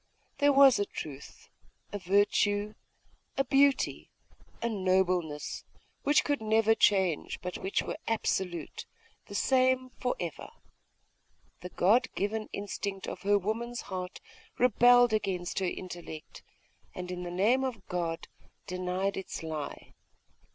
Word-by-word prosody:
There 285 0 +5
was 275 -3 +7
a 205 - +1
truth, 140 -2 -9 0.5
a 205 - -3
virtue, 205 +2 +2 0.6
a 275 - +3
beauty, 275 +1 +2 0.5
a 235 - -1
nobleness, 185 -7 0 0.4
which 290 +1 +3
could 290 -5 -1
never 220 0 +3
change, 190 -7 +2
but 180 0 -5
which 190 - -1
were - - -5
absolute, 185 -7 -2 0.4
the 200 - -8
same 255 +2 +2
for 250 - 0
ever. 170 -4 -5 1.1
The 180 - -7
God 205 +8 +3
given 215 +2 -2
instinct 200 -1 -4
of - - -6
her 205 +1 +3
woman's 230 +4 -3
heart 185 -1 -6 0.4
rebelled 245 0 +5
against 185 -5 -1
her 190 - 0
intellect, 175 -4 -8 0.5
and, 180 0 -5
in 180 0 -5
the 175 - -5
name 215 +9 +2
of 235 -7 -4
God, 170 -2 -3 0.4
denied 185 +2 -2
its 190 -3 -6
lie.... 155 -3 -6
200 Hz, 125 wpm, -30 LUFS, 180-235 Hz, 1.1 s, was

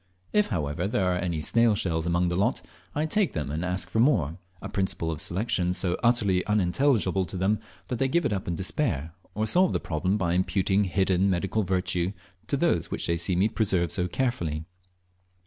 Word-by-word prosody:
If, 210 0 +3
however, 85 -2 -2
there 95 -3 +1
are 90 - -1
any 85 -4 -2
snail 115 +2 +3
shells 85 -4 -1
among 85 0 +1
a - - -1
lot, 105 +8 0 0.3
I 150 +2 +1
take 205 +4 +1
them, 75 -2 -3
and 80 +3 -3
ask 90 +1 -2
for 110 - -2
more 95 - +2 0.2
a 100 - -6
principle 95 -4 -1
of 80 - 0
selection 90 -2 0
so 90 -1 +1
utterly 105 -6 +2
unintelligible 105 0 +2
to 90 +2 -6
them, 100 +4 +1 0.3
that 125 - -3
they 135 - +2
give 170 +5 +1
it - - +1
up 95 - -3
in 85 - -1
despair, 85 - -1 0.2
or 105 +2 0
solve 180 - +3
the - - +1
problem 90 +5 -1
by 85 -4 0
imputing 95 +2 +1
hidden 95 +1 +2
medical 95 +4 0
virtue 90 -1 0 0.3
to - - 0
those - - +1
which - - -3
they 85 - +1
see 85 +2 +1
me 95 +4 +3
preserve 95 -7 0
so 90 - 0
carefully. 85 - -2
95 Hz, 200 wpm, -27 LUFS, 85-110 Hz, 0.3 s, If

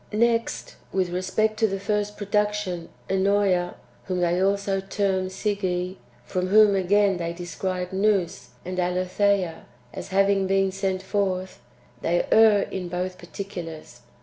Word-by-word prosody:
2. 210 - -4
Next, 230 0 0
with 185 -2 0
respect 200 +4 0
to 220 - +4
the 195 -1 -3
first 210 +1 -1
production 210 -4 -1 0.2
Ennosa, 190 -2 +2 0.3
whom 180 -1 -2
they 175 +1 +2
also 195 0 +1
term 190 -1 0
Slge, 185 -2 -2 0.3
from 185 0 -2
whom 210 +1 +6
again 195 +1 +3
they 170 -1 -3
describe 180 +1 -4
Nous 195 -2 +1 0.2
and 185 +1 -3
Aletheia 185 0 0 0.3
as - - -6
having 195 0 +2
been 195 0 +2
sent 190 -1 -2
forth, 190 -2 -2 0.4
they 175 +1 +1
err 215 -2 +6
in 180 -2 -4
both 180 +1 -3
particulars. 165 -10 -8
190 Hz, 135 wpm, -25 LUFS, 180-205 Hz, 0.4 s, whom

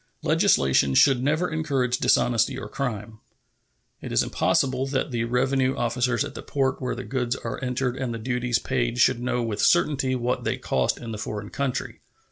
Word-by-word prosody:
Legislation 65 0 +3
should 135 - +5
never 155 +6 +1
encourage 135 -6 0
dishonesty 115 -2 +2
or - - -6
crime. 110 -3 -5 0.8
It - - -7
is - - +3
impossible 130 0 0
that 135 +1 -2
the 115 -1 -1
revenue 130 +2 +1
officers 120 +2 0
at - - -8
the - - -7
port 135 -1 -1
where 125 - -2
the - - -6
goods 125 -2 -2
are - - -6
entered 125 0 -1
and 130 -3 -3
the 115 - -4
duties 120 0 -1
paid 120 -2 -1
should 120 - +3
know 125 -1 -1
with 110 -3 -2
certainty 135 -6 +2
what 125 0 -1
they - - -1
cost 65 -1 0
in 115 -2 -7
the 105 - -5
foreign 105 0 -5
country. 140 -2 -3
125 Hz, 180 wpm, -25 LUFS, 115-135 Hz, 0.8 s, should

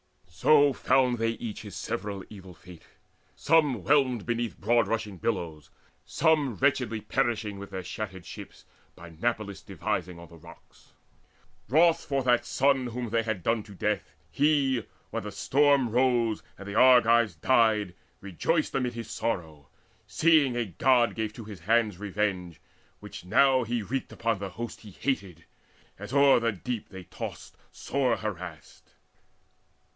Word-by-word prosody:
So 140 - +4
found 125 -3 +2
they 115 0 +1
each 115 -2 -7
his 105 -6 -10
several 100 -2 -4
evil 95 -4 -12
fate, 90 -2 -15 0.5
Some 145 - +2
whelmed 130 -4 +2
beneath 120 -1 -3
broad 115 +3 +2
rushing 110 -4 -3
billows, 85 -7 -3 0.3
some 150 -7 +1
Wretchedly 125 -5 0
perishing 110 -6 -1
with 100 - -8
their 95 -1 -6
shattered 95 -2 -6
ships - - -11 0.3
By 85 0 -12
Nauplius' 100 +2 -3
devising 90 -1 -3
on 85 -1 -12
the 85 - -14
rocks. 85 +1 -18 0.8
Wroth 165 +4 +4
for 135 -1 -1
that 120 -1 +3
son 135 -2 +2
whom 120 -1 -5
they 115 0 +2
had 110 -5 -3
done 115 -1 +1
to 105 -1 -13
death, - - -2 0.2
He; 140 -5 +2 0.3
when - - -3
the - - -7
storm 140 -2 +2
rose 120 -2 +2 0.2
and 100 - -10
the 100 - -5
Argives 120 -4 +5
died, 105 0 +2 0.3
Rejoiced 100 - -1
amid 125 -2 -1
his 115 -2 -7
sorrow, 80 -10 -4 0.4
seeing 155 -6 +3
a 120 -1 0
God 120 +5 +2
Gave 110 -1 -3
to 115 - -9
his 105 -3 -10
hands 105 +1 +1
revenge, 95 -5 -3 0.4
which - - -9
now 130 +7 +4
he 115 -1 -2
wreaked 130 +6 -4
Upon 115 -3 -1
the 100 -1 -5
host 115 +5 -7
he 110 - -12
hated, 95 - -4 0.5
as 105 +3 -8
o'er 140 -2 +5
the 115 -1 0
deep 110 +4 -5
They 95 -1 -10
tossed - - -8 0.2
sore 130 -4 -1
harassed. 90 -7 -7
115 Hz, 150 wpm, -27 LUFS, 95-130 Hz, 0.8 s, Argives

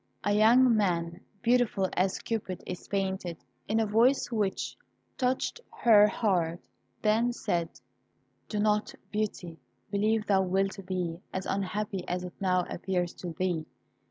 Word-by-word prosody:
A 205 - +1
young 230 +3 +6
man, 170 -4 0 0.2
beautiful 240 -5 +3
as 185 +1 +1
Cupid 205 -5 -4
is 180 -1 -7
painted, 190 -3 -2 0.3
in 220 +1 +1
a 225 - +2
voice 235 +6 +3
which 210 -4 -1 0.4
touched 255 - -1
her 210 -3 +6
heart, 175 -7 0 0.4
then 225 +3 +3
said 170 -8 -1 0.8
"Do 210 - -3
not, 210 0 +1 0.2
Beauty, 200 -6 -3 0.3
believe 215 +1 +1
thou 195 -2 +3
wilt 195 +1 0
be 175 -3 -2
as 190 0 -3
unhappy 195 0 -2
as 180 0 -2
it 180 -1 -7
now 185 -2 +2
appears 180 -1 -2
to 175 -2 -7
thee. 175 -4 -1
195 Hz, 135 wpm, -29 LUFS, 180-215 Hz, 0.8 s, young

